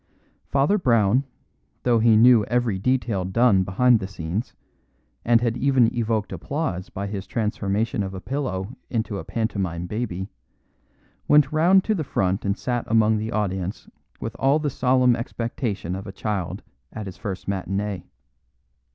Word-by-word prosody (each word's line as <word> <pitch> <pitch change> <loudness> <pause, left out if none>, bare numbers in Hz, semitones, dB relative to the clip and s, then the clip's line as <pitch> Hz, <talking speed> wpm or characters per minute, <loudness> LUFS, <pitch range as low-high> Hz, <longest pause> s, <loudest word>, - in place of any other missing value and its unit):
Father 140 +10 +2
Brown, 115 - +3 0.6
though 120 -2 +3
he 110 -1 +5
knew 120 -1 +7
every 120 -5 0
detail 120 -4 0
done 100 +1 +3
behind 115 +6 +3
the 95 - -4
scenes, 95 +3 -4 0.7
and 115 0 +4
had 120 -1 0
even 130 -2 +3
evoked 110 -3 -1
applause 140 - -3
by 100 - -5
his 100 -1 -5
transformation 105 0 -1
of 95 -1 -4
a - - -5
pillow 125 - -3
into 110 -4 -2
a - - -6
pantomime 95 -7 -2
baby, 95 -2 -4 1.0
went 150 -2 +5
round 175 +5 +4
to 220 - +1
the 170 -7 -1
front 95 -7 -1
and 100 +1 0
sat 120 -2 -2
among 110 -1 +3
the 110 +1 -3
audience 95 -2 -2 0.3
with - - -5
all 135 +2 +4
the 150 -2 -2
solemn 125 -1 +3
expectation 115 -6 -3
of 95 +3 -7
a - - -5
child 100 -2 -3 0.3
at 110 - -6
his 95 - -8
first 95 -2 -6
matinee. 100 0 -2
110 Hz, 150 wpm, -24 LUFS, 95-125 Hz, 1.0 s, knew